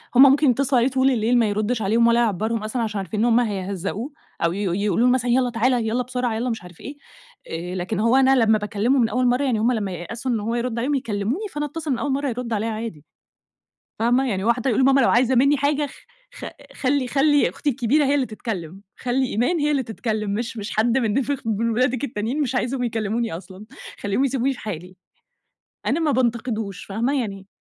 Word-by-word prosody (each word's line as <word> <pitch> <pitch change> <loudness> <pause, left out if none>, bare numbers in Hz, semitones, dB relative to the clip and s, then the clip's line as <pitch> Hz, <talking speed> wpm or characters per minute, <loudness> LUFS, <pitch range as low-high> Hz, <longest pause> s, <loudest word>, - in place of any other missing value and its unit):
هم 255 - +8
ممكن 275 +1 +5
يتصلوا 265 0 +2
عليه 255 - +3
طول 265 0 +3
الليل 235 +1 +2
ما 230 - +3
يردش 215 +3 -1
عليهم 230 +4 +3
ولا 235 0 +4
يعبّرهم 220 0 0
أصلًا، 230 +3 -2
عشان 215 -2 -2
عارفين 195 +2 -4
إن 225 - +3
هم 240 0 +4
هيهزقوه 200 - -3 0.3
أو 170 - +2
ي - - -5
ي 200 -1 -1
يقولوا 230 +4 +2
له 250 - +4
مثلًا 245 -1 0
يالَّا 250 0 +3
تعالَ 240 +2 +1
يالَّا 245 +3 0
بسرعة 250 -1 -2
يالَّا 245 +3 -1
مش 225 -6 -4
عارف 180 -2 -14
إيه، 285 +1 -8 0.5
آآ، 175 +3 -5
لكن 185 +4 -3
هو 230 +3 +3
أنا 270 0 +5
لمَّا 220 -3 +4
باكلمه 210 +5 0
من 230 -2 +3
أول 250 +3 +1
مرة 250 +3 +2
يعني 240 -5 +1
هم 235 +3 +2
لمَّا 210 -5 -2
ييأسوا 225 +9 -5
إن 230 - 0
هو 225 +3 -2
يرد 240 -1 -2
عليهم، 275 +5 0
يكلموني 240 - -2
فأنا 295 0 -2
اتصل 305 0 -4
من 245 - 0
أول 285 - -1
مرة 280 +1 -1
يرد 240 -1 -4
عليَّا 220 +1 -1
عادي، 215 -9 -6 0.9
فاهمة؟ 245 +4 +2
يعني 190 -2 -2
هو 235 - +5
حتى 245 +2 -3
بيقول 235 - +2
لماما 270 +1 +5
لو 235 - +4
عايزة 250 +2 +3
مني 280 +4 +4
حاجة 290 +1 0
خ 275 - -13 0.4
خ - - -9 0.3
خلي 270 -1 0
خلي 290 +2 +3
أختي 295 - -2
الكبيرة 275 +4 +1
هي 280 +1 +2
اللي 275 -3 +1
تتكلم، 195 -6 -6 0.2
خلي 255 +1 0
إيمان 245 - 0
هي 295 +1 +1
اللي 280 -2 +1
تتكلم، 220 -2 -3
مش 230 +1 -3
مش 205 -1 -5
حد 235 +4 +2
من 235 +2 +1
خ - - -5 0.2
من 225 +1 0
ولادك 250 +2 +1
التانيين 235 +3 -3
مش 265 -2 -2
عايزهم 255 +1 -1
يكلموني 225 0 -2
أصلًا، 190 +3 -11 0.4
خليهم 205 +7 0
يسيبوني 270 0 0
في 245 - -9
حالي. 180 -2 -7 0.9
أنا 285 - +1
ما 315 -3 +1
بانتقدوش 235 -6 -1
فاهمة 235 +8 -1
يعني 195 -4 -6
235 Hz, 220 wpm, -22 LUFS, 215-260 Hz, 0.9 s, هم